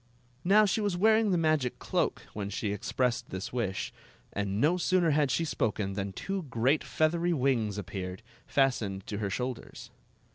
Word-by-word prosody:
Now 210 +4 +6
she 205 +2 +1
was 200 -4 0
wearing 220 +2 +4
the 180 - +3
magic 155 -6 +1
cloak - - -1
when 100 -1 -4
she 105 0 -2
expressed 120 +4 -1
this 95 +4 -5
wish, 110 -6 -2 0.4
and 100 0 -1
no 155 +8 +3
sooner 180 -2 +2
had 145 -1 +3
she 165 +6 +1
spoken 105 -8 -1
than 100 0 -3
two 195 - -3
great 125 +6 +2
feathery 170 +2 +1
wings 125 -8 +1
appeared, 95 0 -5 0.2
fastened 110 -8 +1
to 105 - -4
her 105 -2 -1
shoulders. 125 +4 -5
125 Hz, 160 wpm, -30 LUFS, 100-170 Hz, 0.4 s, Now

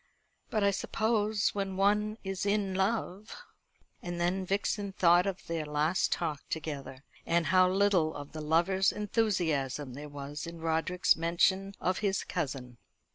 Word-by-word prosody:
But 215 -2 0
I 200 - +4
suppose 215 +1 0
when 195 -2 -3
one 210 +2 +2
is 195 -1 -3
in 200 -1 0
love 195 +1 -2 0.3
" - - -40
And 175 -1 -5
then 180 +2 0
Vixen 200 +1 -1
thought 175 0 +4
of 195 -1 -4
their 165 -2 -2
last 150 +4 0
talk 150 -3 -1
together, 145 -4 -5 0.2
and 170 0 +1
how 185 0 +6
little 185 -5 +2
of 145 0 -8
the 155 - -6
lover's 175 +5 +2
enthusiasm 160 - -1
there 145 +3 -8
was 145 +2 -6
in 170 0 -8
Roderick's 165 +3 +2
mention 190 +4 +1
of 185 +1 0
his 200 -2 0
cousin. 125 -4 -4
180 Hz, 150 wpm, -30 LUFS, 155-200 Hz, 0.3 s, how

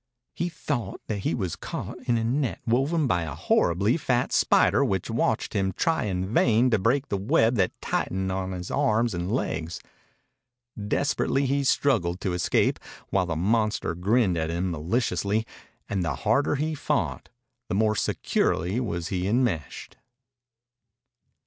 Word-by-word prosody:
He 175 - -2
thought 125 - -4
that 105 -2 -3
he - - -1
was 90 -7 -2
caught - - -6
in 120 - +3
a 115 - -1
net 130 +2 -1
woven 140 +7 +1
by 95 -9 +1
a 75 -3 -4
horribly 100 - +2
fat 125 -5 0
spider - - +4
which 95 +3 -1
watched 115 -1 0
him 95 -2 0
try 160 - 0
in 95 -2 -1
vain 120 +2 +4
to 110 - +3
break 130 +8 +1
the 100 - 0
web 115 +2 +3
that 95 -3 0
tightened 95 0 -1
on 95 0 -2
his 90 -1 -6
arms 120 -5 +1
and 90 +2 -3
legs. 80 -9 -2 1.0
Desperately 135 +5 0
he 140 +1 +1
struggled 105 -11 +1
to 95 - -1
escape 90 -1 +1 0.3
while 90 -2 +1
the 85 - -2
monster 105 +2 +1
grinned 95 +1 +2
at 80 0 -1
him 90 +2 -1
maliciously, 105 +5 0 0.4
and 95 -3 -1
the 75 -5 -1
harder 140 - +1
he 155 +3 -1
fought 150 - -2 0.4
the - - -2
more 110 +1 +2
securely 95 +1 0
was 85 -9 -3
he 90 -1 -1
enmeshed. 105 - -1
105 Hz, 155 wpm, -26 LUFS, 90-125 Hz, 1.0 s, spider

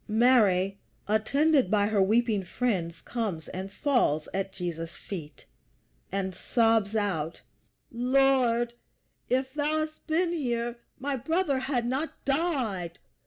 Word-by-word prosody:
Mary, 210 -5 +3 0.3
attended 275 +4 +3
by 205 0 +3
her 210 -1 +2
weeping 215 0 +2
friends, 180 -5 -2
comes 205 -10 -3
and 190 +1 -6
falls 205 - +1
at 195 0 -2
Jesus' 170 -3 -5
feet, 155 -7 -8 0.7
and 190 -1 -2
sobs 225 +1 +2
out: 175 -7 -1 0.5
"Lord, 245 -1 +2 0.6
if 260 +1 0
thou 300 +1 +1
hadst 310 0 -16
been 335 +2 +1
here 240 -6 -2 0.2
my 275 0 -2
brother 300 +1 0
had 255 -2 -1
not 265 +6 -3
died!" 255 - -1
230 Hz, 120 wpm, -28 LUFS, 195-270 Hz, 0.7 s, Mary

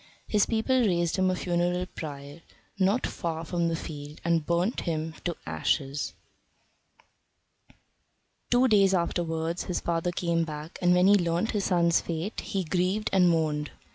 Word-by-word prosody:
His 210 -2 +2
people 235 +3 +1
raised 175 -6 +1
him 185 0 +3
a 185 - +1
funeral 180 0 0
pyre 145 -2 -8 0.4
not 195 +6 +2
far 165 -2 -4
from 170 0 0
the 165 - 0
field 150 -2 -8
and 170 -2 +2
burnt 170 +8 0
him 160 -1 -2
to 175 -2 -2
ashes. 140 -1 -1 2.3
Two 245 +2 +4
days 195 -4 +4
afterwards 170 -1 -1
his 180 - -2
father 170 +1 -1
came 170 -1 0
back, 155 +1 -7
and 180 0 +4
when 180 +1 +4
he 200 - +7
learnt 175 +1 +1
his 205 -3 -1
son's 170 -2 +3
fate 170 +5 -4
he 195 -2 -2
grieved 185 +5 0
and 180 -2 +5
mourned. 155 -3 0
170 Hz, 150 wpm, -27 LUFS, 160-185 Hz, 2.3 s, he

